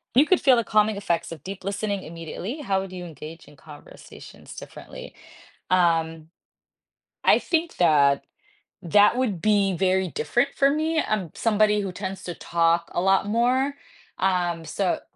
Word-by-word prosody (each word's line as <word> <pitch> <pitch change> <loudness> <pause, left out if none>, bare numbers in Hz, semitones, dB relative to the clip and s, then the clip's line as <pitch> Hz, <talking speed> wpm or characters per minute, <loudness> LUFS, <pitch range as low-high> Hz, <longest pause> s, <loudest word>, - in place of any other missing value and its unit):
You 280 - +6
could 370 +2 +2
feel 260 -3 +5
the 235 - +1
calming 215 -1 +2
effects 170 -4 -2
of 160 -4 -9
deep 195 0 -8
listening 200 0 -3
immediately. 170 - -7
How 195 -8 0
would 190 -1 -8
you 180 -1 -7
engage 160 0 -10
in 145 - -17
conversations 145 +1 -14
differently, - - -11 0.6
um, 165 -3 +1 1.0
I - - +6
think 335 0 -2
that 145 -5 +3 0.6
that 205 +6 +4
would 220 -10 -1
be 200 -3 +2
very 185 +1 +1
different 240 - 0
for 275 0 +3
me. 315 +2 0
I'm 200 -6 -2
somebody 210 -1 +2
who 195 -2 -4
tends 190 0 -6
to 175 - -5
talk 170 0 0
a - - -1
lot 195 +2 +2
more. 250 +6 +1 0.4
Um, 175 -3 0
so 190 +1 -1
190 Hz, 155 wpm, -24 LUFS, 170-215 Hz, 1.0 s, You